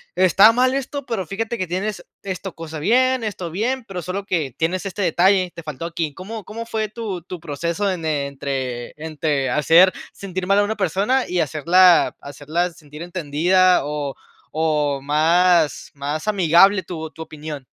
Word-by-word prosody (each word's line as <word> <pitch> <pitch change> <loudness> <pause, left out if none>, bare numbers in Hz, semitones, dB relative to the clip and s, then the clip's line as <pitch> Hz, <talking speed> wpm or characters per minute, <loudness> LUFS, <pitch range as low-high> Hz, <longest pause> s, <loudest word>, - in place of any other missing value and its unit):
está 190 +4 +6
mal 255 +2 +2
esto, 275 +1 -4
pero 225 -6 -3
fíjate 225 +7 -3
que 185 - -2
tienes 185 +1 -3 0.2
esto 190 -1 -5
cosa 160 -1 -7
bien, 255 +6 +2
esto 185 -5 -4
bien, 235 +8 -2
pero 185 -2 -5
solo 185 +4 -4
que 155 -10 -2
tienes 180 +4 -1
este 195 +1 -4
detalle, 185 +1 +3
te 170 - -8
faltó 155 +1 -6
aquí? 165 -3 -3
¿Cómo 205 +6 -8
cómo 230 +4 -7
fue 220 -2 -2
tu 210 -5 -5
tu 180 +1 -8
proceso 170 +5 -2
en 175 -4 -3
entre 140 -4 -3
entre 150 -3 -2
hacer 165 +5 +5 0.2
sentir 185 -2 -5
mal 200 +1 +3
a - - +4
una 220 +2 -2
persona 205 - +1
y 180 - 0
hacerla 175 +4 +4
hacerla 150 +5 -3
sentir 150 -1 -13
entendida, 175 0 +2
o 145 -2 -3 0.4
o 150 -3 0
más 160 +3 +2
más 145 +4 -4
amigable 190 0 +4
tu 160 -3 -6
tu 160 - -12
opinión? 150 -3 -8
175 Hz, 165 wpm, -21 LUFS, 155-195 Hz, 0.4 s, está